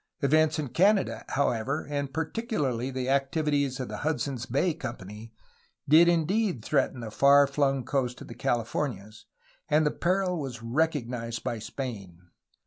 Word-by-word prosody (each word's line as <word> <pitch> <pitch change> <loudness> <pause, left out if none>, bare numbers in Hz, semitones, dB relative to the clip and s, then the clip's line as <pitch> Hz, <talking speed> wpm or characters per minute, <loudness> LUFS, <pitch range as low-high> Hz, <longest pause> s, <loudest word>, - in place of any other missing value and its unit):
Events 155 +2 +3
in 150 -4 -3
Canada, 195 - +2
however, 135 +1 -1
and 140 -2 -3
particularly 150 - -2
the 130 -1 -3
activities 140 0 0
of 130 - -3
the - - -6
Hudson's 140 -5 -2
Bay 150 +8 +1
Company, 115 - -8 0.6
did 160 +4 +7
indeed 175 - +1
threaten 140 -4 0
the 110 -2 -6
far 140 +4 +6
flung 135 -2 0
coast 125 -3 -1
of - - -9
the - - -8
Californias, 115 -2 -3 0.4
and 155 +1 +3
the 150 - +2
peril 180 0 0
was 125 -5 -6
recognized 120 -4 -1
by 115 - -3
Spain. 100 -8 -7
140 Hz, 140 wpm, -28 LUFS, 120-155 Hz, 0.6 s, did